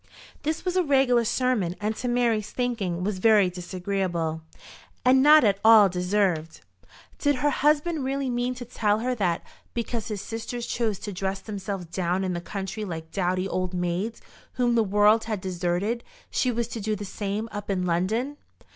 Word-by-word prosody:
This 315 +4 -2
was 365 0 -1
a 370 - +4
regular 270 -6 +3
sermon, 225 -7 0
and 210 +1 -1
to 250 - -3
Mary's 235 -4 +1
thinking 205 -9 -2
was 195 -1 -2
very 205 -3 +5
disagreeable, 180 -2 -2 0.6
and 260 +1 +6
not 300 +1 +8
at 200 -3 +3
all 220 -3 +8
deserved. 180 -3 0 0.6
Did 290 -1 +2
her 290 +3 +1
husband 300 +2 +1
really 270 +1 -1
mean 245 0 -1
to 245 0 -7
tell 210 -3 +1
her 250 +1 0
that, 185 -8 0 0.3
because 235 -1 -3
his 210 -2 -4
sisters 225 +3 -5
chose 225 -4 -1
to 205 +1 -6
dress 190 +1 -2
themselves 195 -3 -5
down 180 +2 -1
in 185 -1 -1
the 175 - -3
country 195 +3 -5
like 160 -4 -6
dowdy 185 0 0
old 185 -1 -2
maids 180 +6 -2 0.3
whom 245 -1 +1
the 230 -1 +4
world 210 +2 +4
had 215 -3 -2
deserted, 185 +5 -1 0.3
she 255 - +1
was 235 -1 -1
to 230 - -5
do 215 +1 -1
the 205 0 -6
same 205 +3 -3
up 205 0 -6
in 185 -2 0
London? 215 +12 0
210 Hz, 175 wpm, -26 LUFS, 185-240 Hz, 0.6 s, not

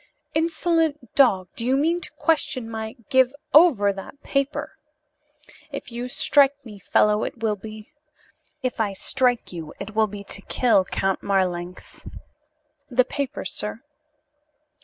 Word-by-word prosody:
"Insolent 320 -4 0
dog! 240 -11 +4
Do 230 - -4
you 260 +3 +2
mean 330 +5 +1
to - - -8
question 295 -7 0
my 220 -1 -5
" - - -44
"Give 260 +1 +4 0.2
over 260 - +6
that 195 +8 -10
paper!" 275 +1 -2 0.9
"If - - -7
you 240 +1 -4
strike 285 0 +4
me, 210 -3 -10
fellow, 210 +3 +2
it 230 - -6
will 215 -2 +2
be 215 +4 -10 0.3
" - - -32 0.3
"If 250 -2 -2
I 210 -3 0
strike 245 +1 0
you 165 -3 -7
it 220 - -7
will 220 0 +3
be 205 0 -8
to 200 0 -6
kill, 225 -3 +2
Count 195 0 -1
Marlanx. 180 -2 -2 0.8
The 255 -1 +3
paper, 280 0 -4
sir." 210 +4 -4
235 Hz, 145 wpm, -24 LUFS, 205-275 Hz, 0.9 s, over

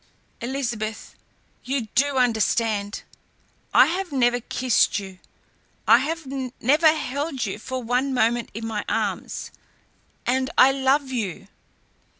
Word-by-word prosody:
Elizabeth, 235 -4 -4 0.5
you 270 +1 -1
do 280 +1 +2
understand! 220 -3 +1 0.7
I - - +7
have 360 +1 -2
never 245 -3 +2
kissed 245 -3 +1
you, 190 -2 -7 0.7
I - - +7
have 325 -1 -3 0.3
never 305 +6 +5
held 285 -3 -3
you 200 +1 -4
for 260 +3 -5
one 250 +4 0
moment 240 -2 +1
in 225 +1 -5
my 215 -2 -3
arms - - -2 0.7
and 260 +1 +1
I 265 - +7
love 270 +1 +1
you!" 200 -5 -4
250 Hz, 120 wpm, -24 LUFS, 225-275 Hz, 0.7 s, I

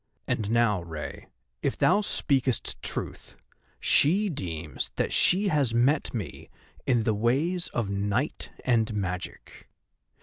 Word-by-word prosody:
And 105 -2 -1
now, 115 -5 +3
Rei, 80 -3 -7 0.3
if - - -1
thou 205 - +4
speakest 135 - 0
truth, - - -5 0.4
she 195 +8 +4
deems 85 - -4
that - - -1
she 195 +3 +4
has 140 -8 +2
met 135 +6 +2
me 110 -7 -6 0.4
in 120 -3 +3
the 110 - +1
ways 140 - +1
of 110 -4 -2
night 100 +8 -1 0.2
and 115 -3 +2
magic. 90 -3 -5
120 Hz, 125 wpm, -27 LUFS, 100-145 Hz, 0.4 s, thou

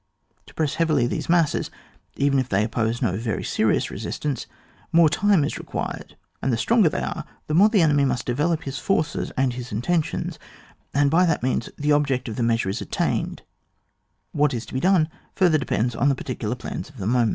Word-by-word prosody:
To - - -16
press 155 -3 0
heavily 155 -7 +2
these 120 - -3
masses, 170 -3 +2 0.5
even 140 -1 +2
if 130 -1 -2
they 100 +2 +2
oppose 115 +2 -1
no 100 -6 +1
very 110 -2 -2
serious - - +1
resistance, 145 -5 -4 0.4
more 165 -1 +6
time 200 -2 +3
is - - -3
re«> - - -8
quired, - - -5 0.3
and 135 - 0
the 115 - +1
stronger 220 - +4
they - - -3
are - - -3 0.2
the 150 - -3
more 195 +7 +6
the 205 -6 +4
enemy 145 -3 +3
must 130 -2 0
develop 150 +6 0
his 135 -2 -5
forces 155 0 -1
and 130 -2 +2
his 125 0 -7
intentions, 150 +10 -1 0.5
and 140 0 +2
by 180 +3 +4
that 160 -7 0
means 125 -2 0
the 150 +1 0
object 140 -3 +1
of 110 - -4
the 120 - -3
measure 115 -4 +1
is 100 - -3
attained; - - -2 0.9
what 145 -3 +1
is 120 - -4
to - - -12
be 130 - 0
done 180 -1 +3 0.3
further 175 -5 +4
depends 120 -3 -1
on 140 - +2
the 140 - +2
particular 125 -3 -4
plans 125 - -6
of 145 - -17
the 95 - -5
moment. 120 0 +2
140 Hz, 205 wpm, -23 LUFS, 120-160 Hz, 0.9 s, more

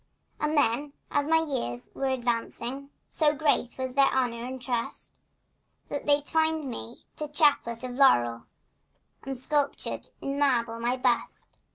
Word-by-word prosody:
And 305 0 0
then, 280 +2 +2 0.2
as 290 0 +1
my 320 +1 +5
years 120 - -3
were 270 - -2
advancing, 250 +1 -2 0.2
So 300 -2 +2
great 285 -4 +1
was 260 -1 -3
their 275 0 +5
honor 240 -3 0
and 260 +1 -5
trust, 245 -2 -4 0.7
That 285 - -4
they 290 0 +5
twined 320 0 +1
me 115 - -7 0.2
a 300 - -1
chaplet 290 -6 +2
of 255 - -4
laurel 120 - +4 0.7
And 270 -2 -6
sculptured 290 +1 -1
in 275 +1 -3
marble 235 -5 +2
my 240 +2 0
bust. 250 -2 0
265 Hz, 145 wpm, -28 LUFS, 235-290 Hz, 0.7 s, my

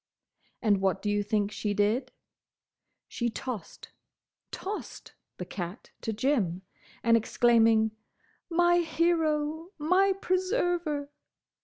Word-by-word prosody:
And 205 -4 +3
what 195 0 0
do 205 - 0
you 205 0 +1
think 205 0 0
she 210 -1 -2
did? 225 +6 +1 1.0
She 235 -1 -2
tossed—tossed!—the 245 - -9
cat 180 +3 -7
to 225 - -2
Jim, 210 - 0 0.4
and, 230 -1 +5
exclaiming, 225 -1 +4 0.6
"My 345 +1 +4
hero! 320 -1 0
My 365 +6 +3
preserver!" 355 -6 -1
250 Hz, 95 wpm, -28 LUFS, 210-335 Hz, 1.0 s, and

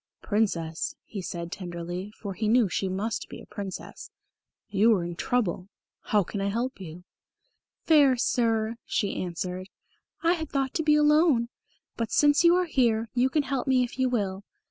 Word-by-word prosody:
"Princess," 170 -7 -1
he 200 - -6
said 170 -1 -5
tenderly, 175 +1 -5
for 200 -3 -5
he 215 +3 -2
knew 230 0 +4
she 190 +1 -2
must 205 +4 -3
be - - -9
a - - -12
Princess, 200 -3 -7 0.6
"you 210 +3 +3
are 180 - -1
in 175 0 -5
trouble. 195 -3 -1 0.4
How 210 -2 +3
can 195 +3 -5
I 195 - 0
help 235 +5 -2
you?" 175 0 -9 0.8
"Fair 285 -5 +5
Sir," 230 -2 +1
she 200 - -1
answered, 180 +1 -4 0.5
"I 335 +1 +4
had 320 -4 -4
thought 270 -1 -1
to - - 0
be 300 -1 +4
alone. 300 -5 +4 0.5
But, 230 -2 -2
since 290 +2 +4
you 340 0 +6
are 365 0 +2
here, 230 -7 +1
you 255 +1 +2
can 300 +2 +1
help 270 -1 -2
me 260 -1 +4
if 245 +1 -6
you 260 -1 +2
will. 200 -5 -2
225 Hz, 175 wpm, -27 LUFS, 190-260 Hz, 0.8 s, you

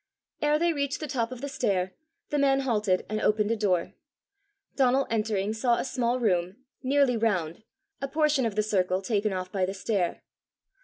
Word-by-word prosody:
Ere 295 0 +3
they 340 +1 +2
reached 280 -1 -2
the 310 - -4
top 250 -4 -1
of 255 -1 -7
the 280 - -3
stair, 190 -9 -1 0.4
the 295 - +1
man 275 -1 +3
halted 210 -8 +1
and 215 0 -2
opened 210 0 +2
a - - +2
door. 190 -6 0 0.8
Donal 265 0 +3
entering 215 -2 0
saw 235 +2 +2
a - - -2
small 250 -1 0
room, 185 -5 +1 0.3
nearly 270 -1 +3
round, 190 -7 0 0.4
a 275 - -1
portion 300 -1 +2
of 210 - -5
the 215 - +2
circle 190 -2 0
taken 210 0 0
off 185 -1 -4
by 195 -2 -1
the 190 +2 -1
stair. 195 -3 -1
220 Hz, 185 wpm, -27 LUFS, 195-270 Hz, 0.8 s, Ere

